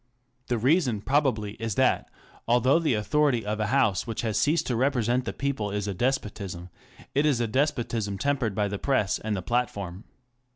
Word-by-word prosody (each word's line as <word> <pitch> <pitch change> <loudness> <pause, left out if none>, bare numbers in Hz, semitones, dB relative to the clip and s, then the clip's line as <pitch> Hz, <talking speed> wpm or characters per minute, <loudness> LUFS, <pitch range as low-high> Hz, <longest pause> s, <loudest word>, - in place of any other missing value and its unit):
The 120 - 0
reason 125 - +2
probably 130 -6 +1
is 115 -3 -2
that, - - +2 0.4
although 125 +6 +4
the 155 -8 +1
authority 125 +2 +1
of 105 +1 -2
a 105 - 0
House 110 -5 +2
which 115 - -3
has 110 -2 0
ceased 155 +3 +2
to 125 - -1
represent 125 -1 +1
the - - -2
people 135 -7 -2
is 105 0 -3
a 100 - -2
despotism, 100 -6 -3 0.4
it 145 - +2
is 145 -5 +2
a 120 - +1
despotism 115 -5 -1
tempered 125 -3 0
by 105 -1 +1
the 100 0 -4
Press 105 -7 +1
and 110 -1 -2
the 95 - -4
Platform. 100 -4 -2
115 Hz, 180 wpm, -26 LUFS, 105-135 Hz, 0.4 s, although